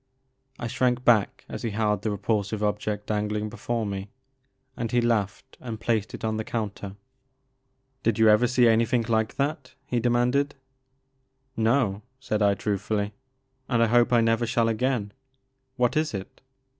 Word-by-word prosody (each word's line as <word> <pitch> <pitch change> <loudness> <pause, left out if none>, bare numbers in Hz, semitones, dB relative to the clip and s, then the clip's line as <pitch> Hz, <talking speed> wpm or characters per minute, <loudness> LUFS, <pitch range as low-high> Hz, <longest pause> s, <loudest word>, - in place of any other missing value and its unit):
I 120 - -5
shrank 125 +1 0
back 110 -4 +3
as - - -6
he 115 - -2
held 105 -1 0
the 110 - -1
repulsive 105 +1 -1
object 105 0 -1
dangling 105 0 -1
before 115 +1 -3
me, 100 0 -4 0.7
and 115 -2 -3
he 120 - +3
laughed 115 +2 -1
and 115 -3 -6
placed 110 -2 -1
it - - -6
on 110 0 -1
the 110 - -2
counter. 100 -3 -4 1.1
"Did 115 -2 +1
you 110 -1 +5
ever 110 +3 +5
see 125 0 +2
an3rthing 115 0 +3
like 110 -1 +1
that?" 140 -2 -2
he 120 - -1
demanded. 125 +4 +1 1.0
No," 110 -3 +1 0.2
said 110 -5 -2
I 100 -1 +4
truthftdly, 105 0 -1 0.3
'* 130 0 -45
and 120 -3 +3
I - - +5
hope 120 +2 +3
I 120 -1 +5
never 115 +1 +2
shall 115 -1 +2
again. 115 -2 -1 0.6
What 125 -2 +1
is 155 -6 0
it 95 - -8
115 Hz, 160 wpm, -26 LUFS, 105-120 Hz, 1.1 s, you